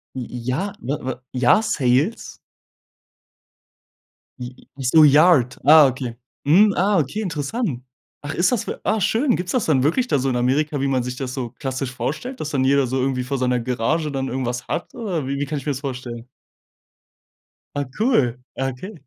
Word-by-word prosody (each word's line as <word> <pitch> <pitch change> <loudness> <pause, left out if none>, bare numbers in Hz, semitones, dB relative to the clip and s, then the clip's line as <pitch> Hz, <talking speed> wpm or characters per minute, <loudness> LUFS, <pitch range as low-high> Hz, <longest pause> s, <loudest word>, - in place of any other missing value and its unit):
J - - -4
j 125 - -6
ja, 185 +11 -1
ne, 135 +5 -2
w 130 -1 -5
Jahr-Sales? 130 - +1 2.0
J 125 0 -7 0.2
ach 135 - -6
so, 155 +5 +6
Yard, 145 -3 +5
ah, 155 0 +8
okay. 125 -2 -4 0.3
Mhm, 200 +8 +5
ah, 195 +1 +2
okay, 155 +9 -2
interessant. 165 - -3 0.4
Ach, 145 0 -5
ist 180 +7 +2
das 230 -2 -1
w - - -3
ah, 215 +2 +1
schön. 240 +7 +2
Gibt's 180 +1 -3
das 250 -4 0
dann 135 -5 +2
wirklich 180 - +1
da 145 - +1
so 135 +1 0
in 125 - -1
Amerika, 140 +4 0
wie 140 - +1
man 130 -2 +1
sich 125 0 -5
das 130 -1 -5
so 125 -3 -4
klassisch 130 -1 -4
vorstellt, 150 - -4
dass 155 - -4
dann 135 -2 +1
jeder 140 +1 +3
so 130 +2 -1
irgendwie 130 -1 0
vor 135 +2 -3
seiner 125 -1 +1
Garage 130 +6 -1
dann 135 -1 -2
irgendwas 125 -1 -3
hat? 175 - -4
Oder 185 - -3
wie 140 +1 -2
wie 145 - -1
kann 150 +2 -4
ich 140 - -7
mir 145 - 0
das 135 - -4
vorstellen? 125 -3 -6 1.5
Ah, 145 - 0
cool. 210 - +2 0.2
Ah, 135 - 0
okay. 185 - -9
140 Hz, 190 wpm, -21 LUFS, 125-165 Hz, 2.0 s, ah